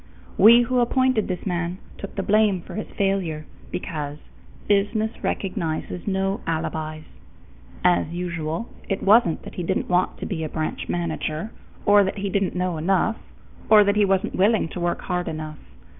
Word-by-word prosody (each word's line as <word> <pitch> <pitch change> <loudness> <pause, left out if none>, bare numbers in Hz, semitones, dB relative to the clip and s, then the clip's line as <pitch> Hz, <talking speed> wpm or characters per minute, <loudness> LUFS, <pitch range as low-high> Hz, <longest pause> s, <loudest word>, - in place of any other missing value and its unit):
We 235 +2 +8
who 250 +1 +1
appointed 255 -1 +2
this 180 -2 -4
man 175 -1 -2 0.2
took 200 - -7
the 195 - -1
blame 210 -3 +3
for - - -10
his 215 +3 -4
failure, 185 -6 0 0.3
because 150 -5 -4 0.5
business 210 +2 +2
recognizes 180 -2 -3
no 195 0 0
alibis. 155 -1 -3 0.8
As 180 -1 +3
usual, 170 +3 -3 0.2
it 195 - -1
wasn't 200 -5 +4
that - - -9
he - - -4
didn't 190 +3 -1
want 180 0 +1
to - - -5
be 160 -5 -3
a 155 - -3
branch 155 0 -3
manager, 170 +2 -2 0.3
or 205 0 +6
that 190 +2 -2
he 200 0 -2
didn't 195 -2 0
know 180 -2 -1
enough, 195 +6 +1 0.5
or 215 -1 +8
that 200 0 +2
he 210 - +4
wasn't 195 -1 +1
willing 200 -2 +2
to 180 - -6
work 175 0 -1
hard 180 0 -2
enough. 155 -1 -5
185 Hz, 165 wpm, -23 LUFS, 165-205 Hz, 0.8 s, We